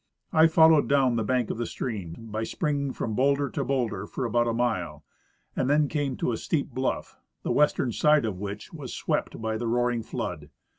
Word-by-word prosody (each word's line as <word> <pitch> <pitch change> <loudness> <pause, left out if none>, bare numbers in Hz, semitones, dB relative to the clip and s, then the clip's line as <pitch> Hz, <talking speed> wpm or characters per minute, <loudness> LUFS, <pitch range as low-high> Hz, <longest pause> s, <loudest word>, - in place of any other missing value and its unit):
I 160 +1 +7
followed 160 -1 +5
down 135 -3 +3
the 115 - 0
bank 125 +1 0
of - - -5
the 120 - -1
stream, 100 -9 -4 0.2
by 110 +1 -2
springing 140 +1 -1
from 110 - -3
bowlder 140 +2 +2
to - - -2
bowlder, 130 -4 -1
for 130 - -3
about 120 +1 +1
a - - +1
mile, 95 -11 -2 0.5
and 130 - 0
then 150 +1 +4
came 140 -3 -2
to - - 0
a 115 - -2
steep 150 +3 -2
bluff, 130 0 -3 0.2
the - - -1
western 145 -4 +2
side 150 +2 +3
of 100 -5 -3
which 105 - -6
was 145 -6 -7
swept - - -2
by 110 0 -2
the 120 +1 -3
roaring 120 0 +1
flood. - - -5
125 Hz, 200 wpm, -27 LUFS, 110-140 Hz, 0.5 s, I